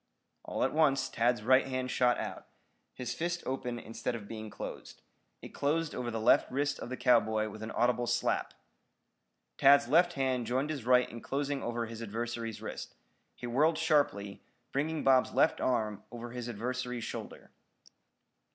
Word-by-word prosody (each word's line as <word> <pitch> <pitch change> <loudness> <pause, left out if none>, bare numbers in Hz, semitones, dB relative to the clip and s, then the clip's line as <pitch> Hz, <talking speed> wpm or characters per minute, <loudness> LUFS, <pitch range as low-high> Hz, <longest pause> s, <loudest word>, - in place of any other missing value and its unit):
All - - -2
at - - +1
once 145 -3 +3
Tad's 120 -1 +1
right 130 +3 +4
hand 130 -1 -2
shot 125 -1 +3
out, - - -6 0.4
his 125 -1 -5
fist 175 +1 -2
open 125 -2 -3
instead 115 +1 -4
of 105 -3 -8
being 110 -1 -7
closed. 100 - -8 0.4
It - - -7
closed 155 +2 0
over 125 -1 -3
the 115 -1 -3
left 110 - +4
wrist 145 +2 0
of - - -6
the 130 - -4
cowboy 110 -3 +3
with 110 +1 -10
an 110 - -5
audible 120 0 +1
slap. - - 0 1.0
Tad's 140 0 +6
left 175 +6 +4
hand 130 -4 0
joined 130 +5 0
his 140 -7 -5
right 125 0 +5
in 115 +1 -9
closing 140 0 -2
over 120 0 -2
his 115 0 -8
adversary's 115 +1 -4
wrist. - - -6 0.4
He - - -8
whirled 150 +7 +2
sharply, 145 - +1 0.3
bringing 155 +3 -1
Bob's 130 -1 +4
left - - +3
arm 110 -5 0
over 120 0 -7
his 125 -1 -5
adversary's 125 +1 -3
shoulder. - - -7
125 Hz, 165 wpm, -31 LUFS, 115-140 Hz, 1.0 s, Tad's